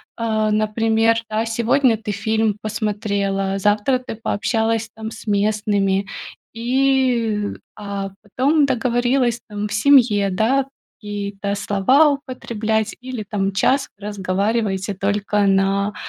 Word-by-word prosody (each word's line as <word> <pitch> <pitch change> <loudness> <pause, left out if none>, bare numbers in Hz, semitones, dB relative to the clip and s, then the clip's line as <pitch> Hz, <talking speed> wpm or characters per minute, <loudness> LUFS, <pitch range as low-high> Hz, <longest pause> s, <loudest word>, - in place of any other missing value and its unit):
А, 220 -2 0
например, 225 +1 +2
да, 220 +1 -1
сегодня 230 +1 +2
ты 210 -1 -5
фильм 220 0 0
посмотрела, 200 -3 -1
завтра 210 +6 +2
ты 250 -2 -7
пообщалась 225 +1 -1
там 220 0 -6
с - - -11
местными, 205 -1 +1 0.5
и, 240 -3 +1 0.3
а 200 -1 -5
потом 275 +8 +2
договорилась 245 -1 +1
там 210 0 -3
в - - -5
семье, 215 -4 +4
да, 240 +8 +1 0.3
какие-то 200 -1 -4
слова 230 +10 +3
употреблять 225 -6 -2
или 250 -3 -6
там 200 -2 -1
час 270 +7 +2
вы 205 - -11
разговариваете 200 0 -1
только 205 +1 0
на 195 +1 +2
215 Hz, 115 wpm, -20 LUFS, 200-235 Hz, 0.5 s, семье